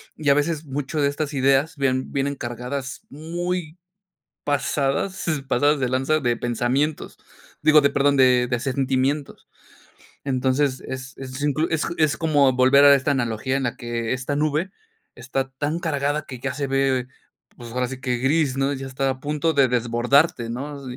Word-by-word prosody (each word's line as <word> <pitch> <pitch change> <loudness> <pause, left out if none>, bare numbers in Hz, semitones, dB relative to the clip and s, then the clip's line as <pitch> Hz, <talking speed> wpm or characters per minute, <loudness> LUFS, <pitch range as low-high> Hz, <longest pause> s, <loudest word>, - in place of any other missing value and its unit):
y 150 -2 -1
a - - +7
veces 155 +1 0
mucho 145 +2 -3
de 140 - +3
estas 145 +1 -3
ideas 135 +4 +2
vienen 130 -2 -1
vienen 140 +1 -1
cargadas 125 +2 -5
muy 170 +2 -4 0.7
pasadas 145 +5 -1 0.2
pasadas 145 +3 +2
de 130 - +1
lanza 135 +5 +1
de 120 -3 0
pensamientos, 120 +6 -1 0.5
digo 155 -1 +6
de 140 - +3
perdón, 140 0 +2
de 125 -1 +5
de 120 -1 -1
sentimientos. 135 +1 -1 0.8
Entonces, 130 0 0
es 130 -1 -7
es 130 0 -7
inclu 150 +2 +1
es 160 -1 0
como 145 -5 +3
volver 130 +3 +5
a 140 0 +9
esta 140 +1 +1
analogía 125 0 -1
en 135 - -2
la 120 - -2
que 120 -1 -3
esta 130 +3 -2
nube 155 +5 0 0.4
está 135 +2 -3
tan 145 +4 -2
cargada 145 -2 -1
que 130 -3 -8
ya 135 0 -2
se 140 0 -3
ve, 135 -2 +1 0.5
pues, 120 -2 -10
ahora 125 +1 0
sí 130 0 -7
que 125 -3 -1
gris, 135 0 +1
¿no? 135 +1 +1
Ya 135 -1 -5
está 135 +1 -1
a 130 0 -5
punto 150 +3 0
de 140 -2 +4
desbordarte, 120 +2 +2
¿no? 140 +3 -6
135 Hz, 165 wpm, -23 LUFS, 130-145 Hz, 0.8 s, a